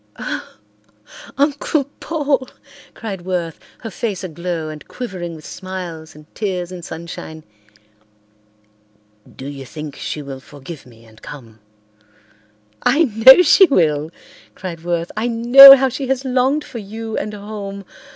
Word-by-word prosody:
"Oh, - - -6 0.8
Uncle 285 +1 +1 0.2
Paul," 290 -5 -1 0.5
cried 200 -5 -6
Worth, 175 -3 -4 0.2
her 225 - -7
face 195 +1 -4
aglow 170 -2 -4
and 155 -1 -10
quivering 185 -9 -6
with 155 - -13
smiles 180 -5 -8
and 150 0 -15
tears 185 -4 -3
and 180 -2 -9
sunshine. 160 -1 -8 1.9
"Do 130 - -9
you 140 -1 -7
think 150 +2 -8
she 150 - -5
will 135 -1 -8
forgive 145 +2 -12
me 115 -1 -18
and 110 0 -20
come?" 115 -7 -12 1.2
"I 280 +7 +3
know 260 - +7
she 375 +4 +6
will," 155 - +1 0.5
cried 170 -3 -7
Worth. 170 -1 -2
"I 220 +3 -1
know 245 +4 +10
how 265 0 +1
she 265 +1 -4
has 265 +1 -1
longed 260 +3 +1
for 240 - -8
you 220 +2 -7
and 210 0 -4
home. 200 -1 -8
185 Hz, 135 wpm, -19 LUFS, 160-245 Hz, 1.9 s, know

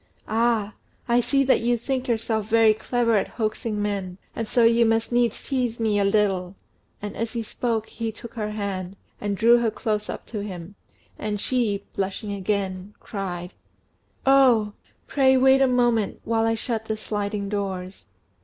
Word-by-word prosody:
"Ah! 220 -2 +1 0.3
I 240 0 +4
see 275 +3 +2
that 265 - +4
you 240 +1 +2
think 255 +2 -2
yourself 220 -2 -1
very 225 -1 +5
clever 230 0 +1
at 195 - 0
hoaxing 215 -1 -2
men, 200 -3 -2 0.2
and 225 - -3
so 240 - +3
you 230 +1 +5
must 225 +1 +1
needs 240 -2 +1
tease 250 -4 -1
me 215 -2 +2
a - - +3
little;" 195 -2 +1 0.5
and, 205 - -5
as 230 +1 -3
he 230 -1 -2
spoke, 225 0 -2
he 225 0 -4
took 225 +1 -11
her 210 -2 -3
hand, 200 -3 -4 0.3
and 205 -1 -2
drew 235 +3 +6
her 235 -1 +2
close 215 -1 -2
up - - -5
to 215 -3 -5
him, 185 -2 -7 0.5
and 210 -1 -2
she, 210 -4 0
blushing 200 +2 -3
again, 195 0 -2
cried 180 -3 -5 0.7
"Oh! 250 -6 +5 0.3
pray 265 -2 +4
wait 265 +1 +5
a 270 - +5
moment, 240 -4 +1
while 225 0 +1
I 225 - +2
shut 225 -1 -3
the 220 -1 -2
sliding 205 -1 -3
doors." 195 -2 -4
220 Hz, 170 wpm, -24 LUFS, 200-235 Hz, 0.7 s, drew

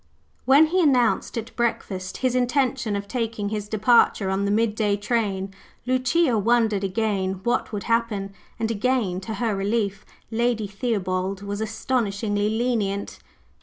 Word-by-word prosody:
When 275 +4 +7
he 360 +4 +1
announced 255 -5 +2
at 230 +1 -6
breakfast 195 -5 -2
his 255 - +2
intention 250 -3 +1
of 200 0 -4
taking 225 -3 -2
his 210 -1 -3
departure 215 -2 +3
on 195 +1 0
the - - 0
midday 210 -1 +1
train, 200 -3 -1 0.3
Lucia 255 +1 +2
wondered 220 -2 +2
again 195 -1 0
what 240 - 0
would 205 -2 -4
happen; 225 -4 -1 0.2
and 225 -1 -1
again, 225 -4 0
to 220 +3 -5
her 220 0 -1
relief, 200 0 -1 0.3
Lady 230 -1 0
Theobald 195 -2 -2
was 205 +1 -4
astonishingly 215 -2 -1
lenient. 220 -3 -1
220 Hz, 135 wpm, -24 LUFS, 200-240 Hz, 0.3 s, When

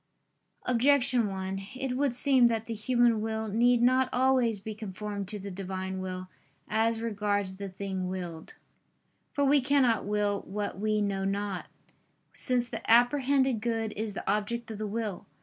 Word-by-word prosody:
Objection 250 -2 +3
1: 195 0 -4
It 260 -1 -3
would 270 -2 +1
seem 255 -1 +6
that 225 -1 -1
the 230 - -4
human 235 0 +2
will 220 0 -2
need 240 +3 +3
not 255 +1 +3
always 250 -4 +2
be 215 +2 -6
conformed 205 -1 -6
to 210 +1 -3
the 200 0 -7
Divine 190 0 -5
will, 185 0 -5 0.4
as 225 +1 +1
regards 205 -3 -1
the 200 0 -5
thing 190 -1 -4
willed. 175 -3 -6 0.8
For 285 -1 +1
we 280 +1 +4
cannot 260 -4 +2
will 205 -1 0
what 205 0 -4
we 215 0 +1
know 195 -1 -1
not: 200 -1 -2 0.7
since 250 -2 +3
the - - -6
apprehended 260 +1 +3
good 225 -2 -2
is 215 -1 -3
the - - -7
object 220 +3 -1
of 215 - -7
the 215 - -3
will. 210 -3 -4
220 Hz, 160 wpm, -29 LUFS, 200-245 Hz, 0.8 s, seem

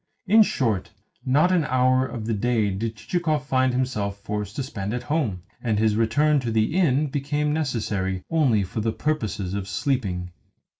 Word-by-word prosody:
In 215 +3 +6
short, 115 - +1 0.4
not 150 +8 +4
an 180 -3 +3
hour 130 0 +2
of 115 -2 -6
the 115 - -1
day 110 -1 +1
did 110 +4 -3
Chichikov 155 +5 -1
find 130 -1 +2
himself 115 -6 -1
forced 105 +1 -5
to 135 - -2
spend 105 -3 -4
at 125 - -4
home, 125 - -1 0.2
and 110 -3 0
his 110 0 +2
return 145 +7 +3
to 125 -3 -3
the 110 +4 +1
inn 155 -6 +3
became 145 +1 -1
necessary 105 -11 -2
only 135 -11 +2
for 100 +4 -4
the 110 0 0
purposes 110 -11 -2
of 100 -1 -3
sleeping. 100 -6 -2
120 Hz, 170 wpm, -24 LUFS, 105-145 Hz, 0.4 s, In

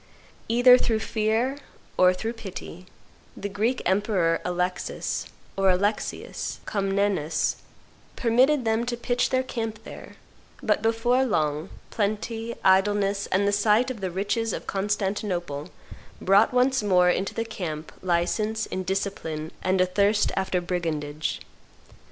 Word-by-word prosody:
Either 245 +2 +7
through 225 -2 +1
fear 220 +5 0 0.4
or 185 0 +6
through 220 +5 -3
pity, 185 -5 -9 0.5
the 205 - -4
Greek 215 +6 -1
emperor, 190 -4 +1
Alexis 180 0 -2 0.3
(or 195 0 +3
Alexius) 205 +4 -1
Comnenus, 195 -6 0 0.6
permitted 255 +3 +3
them 225 +1 +1
to 240 0 -3
pitch 245 +1 0
their 260 0 +1
camp 225 -4 -4
there; - - -11 0.5
"but - - +2
before 230 +3 +2
long, 155 - 0 0.2
plenty, 225 +2 -2
idleness, 200 +1 +3
and 200 +2 +1
the - - +3
sight 210 +5 +3
of 225 -5 -8
the 190 - -1
riches 205 +5 -1
of - - -5
Constantinople 190 -6 -2 0.5
brought 200 +3 +4
once 255 +1 +3
more 180 -3 +4
into 190 +2 -2
the 230 - -1
camp 160 -8 -5
license, 210 +5 0
indiscipline, 185 -4 -3
and 185 0 +1
a 185 - +5
thirst 200 +3 +2
after 190 -1 0
brigandage. 160 -4 -3
200 Hz, 125 wpm, -25 LUFS, 180-225 Hz, 0.6 s, Either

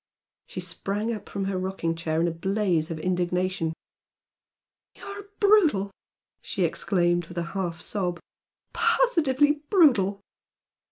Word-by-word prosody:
She - - -6
sprang 210 +4 -3
up 210 -2 -8
from 195 -1 -3
her 195 -1 -1
rocking 185 -3 -2
chair 165 -1 -2
in 170 - +2
a - - 0
blaze 180 -1 0
of 165 - -4
indignation. 180 0 -1 1.2
"You - - -16
are 400 0 -7
brutal!" 335 - +4 0.5
she - - -2
exclaimed, 175 -3 +1
with 175 - -11
a 170 - 0
half 175 -4 -3
sob 180 -4 -2 0.5
"Positively 315 - +3
brutal!" 240 - +4
195 Hz, 125 wpm, -26 LUFS, 175-265 Hz, 1.2 s, brutal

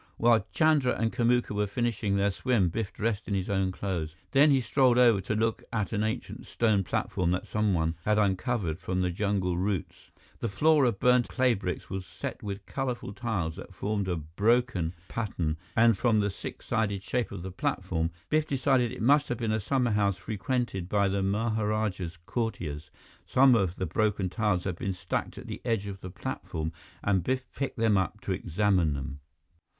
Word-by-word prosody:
While 115 -1 +4
Chandra 155 -6 +3
and 115 -1 0
Kamuka 120 -1 +2
were 105 0 0
finishing 110 -2 -1
their 100 0 +2
swim, 105 -3 +1
Biff 105 +4 -3
dressed 110 -2 -2
in 100 - -1
his 95 0 -2
own 95 -1 +1
clothes. 85 -5 -3 0.2
Then 145 +2 +6
he 135 -2 +5
strolled 130 -1 +3
over 120 -5 +5
to 100 +4 -2
look 115 +1 0
at 110 -1 -1
an 105 - 0
ancient 110 0 -4
stone 110 -4 +2
platform 90 -1 -1
that 90 +1 0
someone 90 -7 +1
had 105 0 +2
uncovered 100 - 0
from 95 -1 -2
the 90 -1 +1
jungle 95 -2 0
roots. 95 -3 -3 0.3
The 115 - -2
floor 150 +7 +4
of 115 -5 0
burnt 125 -1 +4
clay 130 -2 +2
bricks 95 -4 -4
was 95 -1 -3
set - - -6
with 100 -1 -5
colorful 125 -6 -3
tiles 95 -9 -2
that - - -10
formed 100 -1 -1
a 90 - 0
broken 90 - +1
pattern 90 -8 -2 0.2
and 115 -1 +5
from 110 +1 +2
the 100 -1 +1
six - - -8
sided 100 -3 0
shape 125 -2 -1
of 85 - -6
the 95 - -5
platform, 80 -2 -1 0.2
Biff 155 0 +1
decided 130 -4 +2
it - - -5
must 145 +4 +4
have 120 - -1
been 115 -3 -1
a 110 - +1
summerhouse 105 -5 +1
frequented 105 -3 -2
by 100 -1 +2
the 100 0 0
maharajah's 105 -3 -1
courtiers. 80 -11 -3 0.4
Some 130 0 +6
of 95 -6 +2
the 95 - -2
broken 100 +1 0
tiles 100 -2 0
had 90 -3 -3
been 95 - -1
stacked 90 - -3
at - - -8
the - - -6
edge 115 -5 0
of 100 -1 -7
the 90 - -6
platform, 80 -3 -4 0.3
and 95 -3 +2
Biff 130 +5 -1
picked 140 -1 -3
them 110 -3 +3
up 100 +3 -2
to - - -4
examine 90 -3 +1
them. 70 +1 -5
105 Hz, 185 wpm, -28 LUFS, 95-120 Hz, 0.4 s, Then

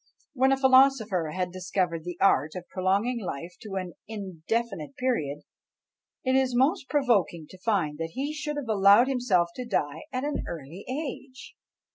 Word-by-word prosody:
When 265 -1 +3
a 270 - +3
philosopher 260 - +4
had 180 -1 -1
discovered 180 -2 -2
the 175 -1 -5
art 155 -5 +3
of 180 -1 -7
prolonging 200 +6 0
life 170 0 -5
to 205 -3 -7
an 185 -2 -4
indefinite 200 -2 -4
period, 150 - -1 0.8
it 260 0 +2
is 260 -2 +2
most 270 +4 +2
provoking 215 - +1
to 185 - -13
find 180 -8 0
that 165 0 -4
he 280 +3 -3
should 300 -1 -4
have 285 -4 -4
allowed 205 +3 +6
himself 235 -10 +2
to 250 - -3
die 155 -10 -2
at 255 0 -2
an 290 0 -2
early 165 +4 -8
age! 270 -1 -6
205 Hz, 160 wpm, -27 LUFS, 175-260 Hz, 0.8 s, allowed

